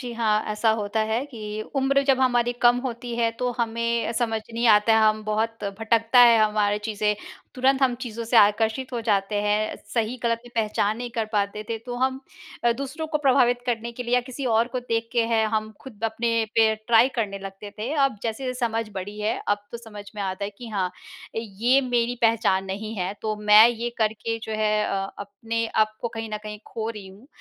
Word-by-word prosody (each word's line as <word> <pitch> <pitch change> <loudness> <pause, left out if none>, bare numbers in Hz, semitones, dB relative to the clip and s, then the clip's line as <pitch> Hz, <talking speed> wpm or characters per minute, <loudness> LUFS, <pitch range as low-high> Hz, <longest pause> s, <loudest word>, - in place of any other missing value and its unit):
जी 245 -3 -6
हाँ। 215 -2 +1
ऐसा 220 +1 +2
होता 205 +2 -1
है 235 +5 0
कि 215 -5 -6
उम्र 275 +1 +3
जब 265 -2 +3
हमारी 245 -2 +2
कम 240 0 +6
होती 240 -1 -5
है 230 -1 +2
तो 250 0 0
हमें 235 0 0
समझ 225 -2 0
नहीं 235 +1 0
आता 210 +1 +5
है, 220 - +4
हम 215 0 -1
बहुत 220 +1 -2
भटकता 225 +2 +2
है 235 -2 +8
हमारी 210 -1 +1
चीज़ें। 210 -1 0 0.4
तुरंत 265 +1 +2
हम 255 -2 +3
चीज़ों 230 -1 -5
से 230 +1 +1
आकर्षित 220 +5 +3
हो 240 - -2
जाते 200 -1 +1
हैं, 210 +1 0 0.2
सही-गलत 230 0 0
में 240 - -13
पहचान 215 -1 0
नहीं 245 0 -5
कर 230 -2 -1
पाते 205 0 -1
थे 225 - -2
तो 245 - -4
हम 260 +1 0 0.4
अ, 235 - +5
दूसरों 275 +5 -5
को 305 -1 -1
प्रभावित 250 -3 +3
करने 235 -1 -2
के 250 - -6
लिए 240 0 0
या 250 - +4
किसी 260 +2 -7
और 230 0 +2
को 255 - 0
देख 230 -2 -2
के 235 -1 +3
हैं 220 -1 +3
हम 215 0 -1
खुद 230 -5 -9
अपने 230 0 0
पे 220 -1 +4
ट्राई 235 +2 +5
करने 205 -4 -1
लगते 195 +1 -9
थे। 230 +7 -3
अब 275 -6 +2
जैसे-जैसे 255 +3 -3
समझ 225 -2 -1
बड़ी 205 +2 -6
है, 210 +1 0
अब 205 0 0
तो 235 - -5
समझ 210 -3 -10
में 205 - -4
आता 190 +1 -3
है 200 - -4
कि 240 - -8
हाँ, 195 -4 -1 0.5
ये 230 +4 +2
मेरी 245 -2 0
पहचान 225 -4 +3
नहीं 210 +3 -5
है, 185 +1 -2
तो 215 -1 -1
मैं 210 +1 +7
ये 240 0 -3
करके 220 +1 -1
जो 220 - -5
है 215 -1 +1
अ, 195 0 -2
अपने 225 +3 -3
आपको 215 +1 0
कहीं 225 -1 -6
न - - -3
कहीं 210 0 -6
खो 225 -1 -4
रही 210 -4 -9
हूँ 200 +7 -16
225 Hz, 210 wpm, -24 LUFS, 210-240 Hz, 0.5 s, है